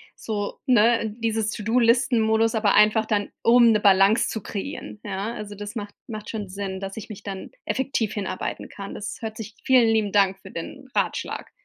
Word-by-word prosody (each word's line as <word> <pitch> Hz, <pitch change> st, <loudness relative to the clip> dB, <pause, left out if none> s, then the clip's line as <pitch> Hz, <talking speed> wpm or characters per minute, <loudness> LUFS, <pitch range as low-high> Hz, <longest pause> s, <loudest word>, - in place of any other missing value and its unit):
so, 205 Hz, -2 st, -4 dB
ne, 230 Hz, -2 st, +4 dB
dieses 225 Hz, -1 st, 0 dB
To-do-Listen 235 Hz, +2 st, +2 dB
Modus, 220 Hz, +1 st, +2 dB
aber 210 Hz, -2 st, +3 dB
einfach 215 Hz, +1 st, +5 dB
dann 205 Hz, -2 st, 0 dB
um 235 Hz, 0 st, +6 dB
'ne 210 Hz, -, +1 dB
Balance 200 Hz, +3 st, +5 dB
zu 220 Hz, -, -4 dB
kreieren, 210 Hz, +1 st, -6 dB
ja. 205 Hz, +2 st, -3 dB
Also 210 Hz, -2 st, -7 dB
das 205 Hz, +3 st, -7 dB
macht 205 Hz, -2 st, -5 dB
macht 215 Hz, -3 st, -7 dB
schon 210 Hz, -3 st, -4 dB
Sinn, 190 Hz, 0 st, -5 dB
dass 195 Hz, 0 st, -6 dB
ich 220 Hz, -, -8 dB
mich 210 Hz, -1 st, -9 dB
dann 195 Hz, -2 st, -6 dB
effektiv 260 Hz, -5 st, -1 dB
hinarbeiten 195 Hz, -3 st, -4 dB
kann. 200 Hz, -1 st, -8 dB
Das 205 Hz, -, -5 dB
hört 220 Hz, -1 st, -5 dB
sich 220 Hz, -1 st, -8 dB
Vielen 255 Hz, -5 st, +5 dB
lieben 220 Hz, -3 st, +1 dB
Dank 195 Hz, -2 st, +3 dB
für 190 Hz, -, -12 dB
den 215 Hz, +10 st, -7 dB
Ratschlag. -, -, -2 dB
215 Hz, 185 wpm, -24 LUFS, 200-225 Hz, -, um